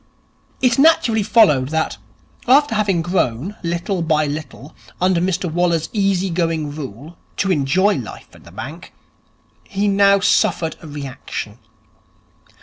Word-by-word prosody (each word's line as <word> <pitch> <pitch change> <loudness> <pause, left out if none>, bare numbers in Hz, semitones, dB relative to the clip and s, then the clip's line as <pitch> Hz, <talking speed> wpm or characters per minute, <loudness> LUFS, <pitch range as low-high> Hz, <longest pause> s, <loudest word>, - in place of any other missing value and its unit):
It 250 0 +3
naturally 265 -8 +4
followed 195 - +4
that, 160 +1 -1 0.5
after 280 0 +4
having 200 -6 +1
grown, 175 - -1
little 175 +2 -2
by 155 -2 +1
little, 150 -1 -7 0.3
under 180 -1 +2
Mr 185 0 -1
Waller's 170 -1 0
easy 195 -3 +1
going 165 -4 -1
rule, 145 +3 -9 0.2
to 195 - 0
enjoy 185 +7 +2
life - - -9
in - - -17
the - - -15
bank, - - -9 0.7
he 205 0 -2
now 200 0 +4
suffered 165 -3 +1
a 165 - -10
reaction. 135 -6 -7
175 Hz, 130 wpm, -19 LUFS, 155-200 Hz, 0.7 s, naturally